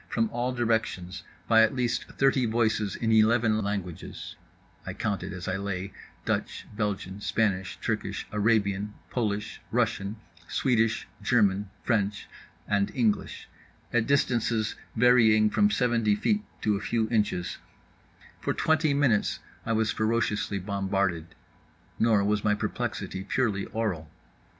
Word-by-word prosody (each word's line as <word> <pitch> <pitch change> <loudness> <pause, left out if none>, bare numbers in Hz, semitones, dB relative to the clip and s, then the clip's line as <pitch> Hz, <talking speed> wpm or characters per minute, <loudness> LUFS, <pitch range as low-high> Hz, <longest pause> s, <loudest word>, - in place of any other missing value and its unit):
From 115 -1 0
all 120 +2 -1
directions, 110 -6 -1 0.3
by 110 -1 +6
at 110 +3 +3
least 125 -2 0
thirty 135 -2 +2
voices 110 -3 +1
in 115 -1 -1
eleven 110 0 +4
languages 100 -5 -5 0.5
(I - - -6
counted 100 -3 -2
as 90 -1 -7
I 95 0 -1
lay 95 -1 -4 0.3
Dutch, - - -2
Belgian, 100 -2 -3
Spanish, 95 -3 0
Turkish, - - -3
Arabian, 105 -1 +1 0.2
Polish, 105 -4 -2
Russian, 110 -4 0 0.3
Swedish, 115 -4 +1
German, 105 -3 +2
French—and 105 -1 -2
English) 115 -5 0 0.5
at 115 -2 +2
distances 115 -5 +1 0.2
varying 110 -3 +5
from 205 0 +4
seventy 120 - +2
feet 210 - +1 0.2
to 105 -1 +2
a 100 - -3
few 115 0 0
inches, 105 -6 0 0.8
for - - -2
twenty 155 -2 +2
minutes 130 -7 +2 0.3
I 115 - +1
was 110 0 +1
ferociously 110 -2 0
bombarded. 95 -3 -1 0.6
Nor 110 -3 +4
was 105 0 +1
my 105 -1 +3
perplexity 95 -2 -3
purely 105 -2 0
aural. 95 -9 -3
110 Hz, 120 wpm, -27 LUFS, 100-115 Hz, 0.8 s, by